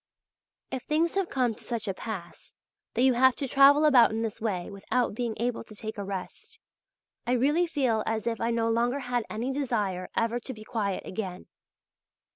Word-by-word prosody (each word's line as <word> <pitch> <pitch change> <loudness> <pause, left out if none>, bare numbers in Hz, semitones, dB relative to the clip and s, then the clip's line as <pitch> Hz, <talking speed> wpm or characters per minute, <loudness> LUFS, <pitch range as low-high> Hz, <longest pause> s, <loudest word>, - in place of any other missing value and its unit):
If 260 -1 -3
things 320 +5 +1
have 390 -2 0
come 250 -3 +1
to - - -12
such 230 -3 -3
a 195 - 0
pass 185 -4 -8 0.4
that 245 - +2
you 260 -1 +5
have 260 +1 +5
to 275 - -3
travel 280 +3 +6
about 260 -6 +7
in 225 +1 -2
this 220 -2 -4
way 195 -6 -2
without 205 +5 -1
being 230 0 -2
able 240 +2 -1
to 215 - -12
take 215 0 -6
a - - -2
rest, 195 - -7 0.7
I 245 - +2
really 295 +8 +3
feel 260 -9 +1
as 220 -1 -1
if 230 -1 -2
I 230 - +1
no 230 -1 +1
longer 240 +4 +1
had 245 -3 -1
any 235 +5 -2
desire 210 -10 -1
ever 230 +1 +1
to 260 +2 -6
be 215 - -10
quiet 205 -4 -2
again. 185 -2 -5
235 Hz, 195 wpm, -28 LUFS, 215-260 Hz, 0.7 s, about